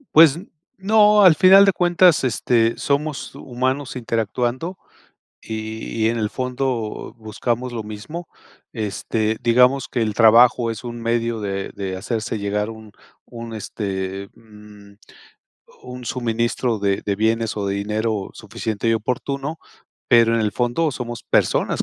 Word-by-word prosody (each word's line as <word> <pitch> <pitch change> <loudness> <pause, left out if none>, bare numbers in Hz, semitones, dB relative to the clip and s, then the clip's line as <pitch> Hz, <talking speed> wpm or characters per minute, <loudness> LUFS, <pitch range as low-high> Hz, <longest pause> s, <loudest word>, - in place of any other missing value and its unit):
Pues 160 -1 +7 0.4
no, 210 +1 +5
al 170 -4 +7
final 195 +3 +7
de 195 - +3
cuentas, 175 -3 +4
este, 115 -1 +1
somos 145 +1 -2
humanos 130 +1 -3
interactuando 120 - -2 0.6
y 110 0 -6 0.2
y 110 - +4
en 115 - -2
el 105 - 0
fondo 125 -3 -3
buscamos 120 +3 -3
lo 115 -2 -4
mismo. 110 +12 -8 0.5
Este, 110 0 -2
digamos 125 +3 +3
que 120 - -1
el 110 -1 -1
trabajo 115 +1 +5
es 115 +2 -7
un 120 -1 -6
medio 115 0 -1
de 100 -1 -4
de 95 -2 -4
hacerse 110 +3 -3
llegar 105 +1 -2
un 110 -2 -11 0.3
un 115 -1 -9
este, 95 -2 -5
mm, 105 -2 -16 0.9
un 125 0 -9
suministro 120 -1 -1
de 100 -1 0
de 100 - 0
bienes 110 +1 0
o 100 - -2
de 100 - -1
dinero 105 0 -2
suficiente 110 0 -4
y 115 - +3
oportuno. 140 +7 -3 0.5
Pero 115 -2 +5
en 115 - +1
el 105 -1 -1
fondo 125 +7 0
somos 120 -2 -6
personas - - +1
115 Hz, 140 wpm, -21 LUFS, 110-130 Hz, 0.9 s, Pues